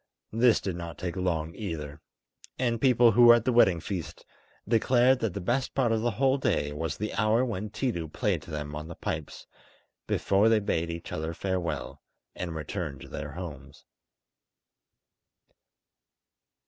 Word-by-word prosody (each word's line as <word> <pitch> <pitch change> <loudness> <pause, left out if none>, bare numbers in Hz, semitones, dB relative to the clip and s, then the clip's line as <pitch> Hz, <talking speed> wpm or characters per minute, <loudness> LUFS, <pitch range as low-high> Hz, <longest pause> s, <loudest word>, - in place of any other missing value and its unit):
This 115 +1 +4
did 95 -3 -3
not 85 -1 -7
take 90 -1 -4
long 85 -4 -1
either; 80 -8 -6 0.6
and 120 -2 0
people 125 -3 +5
who 120 +3 +6
were 120 0 +10
at 120 - -1
the 130 - +2
wedding 95 -8 +5
feast 85 -1 -6 0.4
declared 125 +3 +4
that 110 -7 -2
the - - -2
best 120 +8 -1
part 125 -4 +2
of 110 -1 +1
the 120 - +1
whole 135 +1 +3
day 75 - 0
was 75 0 -3
the 105 +1 -3
hour 115 +3 +2
when 105 -3 -4
Tiidu 100 -8 -2
played 100 -8 0
to - - -14
them 75 -1 -5
on 75 +1 -6
the 85 - -8
pipes - - -5 0.6
before 100 +3 +3
they 115 - +5
bade 85 -5 -1
each 85 0 -6
other 80 +2 -3
farewell 90 -3 -3 0.3
and 85 -3 -5
returned 75 -3 -5
to - - -11
their 75 -2 -6
homes. 75 -6 -9
95 Hz, 160 wpm, -28 LUFS, 80-115 Hz, 0.6 s, were